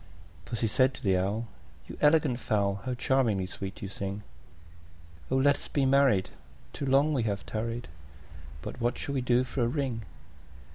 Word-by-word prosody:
II. - - -22 0.4
Pussy 115 +1 -2
said 130 +4 +3
to - - -11
the 95 -3 +3
Owl, 100 +5 0 0.4
"You - - -8
elegant 150 -4 +4
fowl, 100 -4 0
How 125 -1 -1
charmingly 120 -7 +1
sweet 95 +1 -7
you - - -3
sing! 100 +1 -5 1.1
Oh! 130 - +1
let 140 +2 +4
us - - -10
be 140 -2 +1
married; 135 -8 +4 0.4
too 140 - -4
long 140 +3 +4
we 135 - +1
have 100 -3 -2
tarried: 115 +2 -3 0.8
But - - -7
what 120 +1 +1
shall 140 - -4
we 135 - 0
do 125 0 +3
for 130 0 -3
a 120 - +3
ring?" 125 -3 -2
120 Hz, 180 wpm, -29 LUFS, 100-135 Hz, 1.1 s, elegant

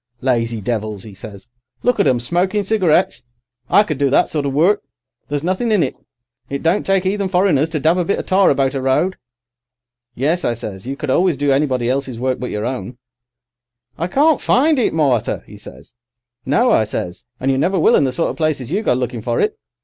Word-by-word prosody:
"'Lazy 115 -3 0
devils! 110 -2 -3
'e 105 - -10
says. 100 +2 -10 0.4
'Look 245 -2 +1
at 200 - +3
'em, 125 - +2
smoking 180 - 0
cigarettes. 180 - +1 0.5
I 205 - +5
could 155 -9 -4
do 140 -1 +2
that 135 - +3
sort 150 -2 -2
of 135 - -2
work. 180 +9 +3 0.5
There's 145 0 -2
nothing 190 +7 -1
in 205 -6 +3
it. 130 - -3 0.5
It 140 0 -4
don't 165 +5 +2
take 195 -1 +2
'eathen 195 0 0
foreigners 180 -5 +2
to 155 -2 -2
dab 160 +5 +2
a - - +2
bit 195 - 0
of - - -4
tar 190 0 +4
about 135 -1 +1
a 135 - -2
road.' 135 +8 +1 1.0
"'Yes,' 155 +8 0
I 120 - 0
says, 105 -2 -8
'you 135 +1 -4
always 175 +5 +2
could 140 - -14
do 145 -1 +2
anybody 135 -3 +1
else's 130 -2 -2
work 130 0 -1
but 125 - -4
your 105 0 -3
own.' 125 -1 -5 1.0
"'I 170 - -1
can't 290 - +3
find 290 +2 +3
it, 240 - +2
Martha,' 140 -8 0
'e - - -13
says. 70 - -14 0.5
"'No,' 235 - +3
I 110 - +4
says, 105 0 -5
'and 135 +1 0
you 135 - 0
never 185 +6 +1
will - - +4
in - - +4
the 130 - 0
sort 165 +6 0
of - - -10
places 155 -5 -1
you 200 +5 0
go 165 - +1
looking 125 -2 -3
for 120 +1 -1
it. 430 0 +1
140 Hz, 215 wpm, -18 LUFS, 125-185 Hz, 1.0 s, I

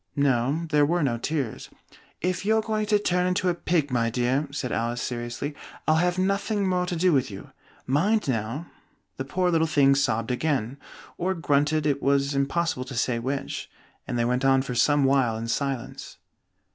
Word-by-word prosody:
No, 140 +3 +1
there 150 -1 +4
were 170 +3 +2
no 120 -4 0
tears. 140 -3 -3 0.5
"If 180 +1 -1
you're 220 +2 +2
going 215 -1 -1
to 210 -1 +4
turn 180 -3 +1
into 180 0 +1
a - - +2
pig, 165 -4 0
my 115 -2 +1
dear," 125 +5 0
said 140 -3 -4
Alice, 120 +1 -1
seriously, 120 +4 -4 0.3
"I'll 155 - +4
have 175 +2 +1
nothing 200 +2 0
more 180 -1 0
to 180 - -2
do 180 +1 +3
with 130 -4 +2
you. 95 - -10 0.3
Mind 190 - +1
now!" 120 +5 -2 0.5
The 130 - -4
poor 180 +5 0
little 160 -1 +2
thing 140 -3 +4
sobbed 115 -4 0
again 130 -2 -1 0.4
(or 190 +2 0
grunted, 150 -1 +1
it 140 -2 +1
was 140 +1 +2
impossible 140 0 0
to 135 - -8
say 115 +1 0
which), 135 +3 -4 0.4
and 120 - -2
they 120 - +1
went 125 +2 0
on 135 0 +4
for 135 - -4
some 145 +4 +3
while 135 -4 +2
in 115 +1 -5
silence. 135 0 -3
140 Hz, 185 wpm, -25 LUFS, 125-175 Hz, 0.5 s, there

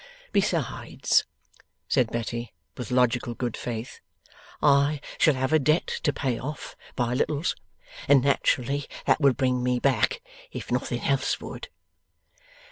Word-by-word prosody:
Besides,' - - +1 0.6
said 125 -5 +2
Betty, 120 0 -4 0.2
with 125 -4 -6
logical 125 -1 +1
good 120 -2 -3
faith, 120 0 -5 0.6
'I 145 0 +4 0.2
shall 155 -4 +5
have 130 +3 -1
a 155 - +6
debt 155 +4 +2 0.2
to 145 - +2
pay 130 -4 -2
off, 150 +4 -6 0.2
by 120 -1 0
littles, 145 +5 0 0.5
and 135 -3 +6
naturally 140 0 +1 0.2
that - - +3
would 135 -4 +4
bring 130 -2 +1
me 125 0 +1
back, 140 - +1 0.3
if - - -7
nothing - - -1
else - - +1
would. - - -8
130 Hz, 130 wpm, -26 LUFS, 125-145 Hz, 0.6 s, a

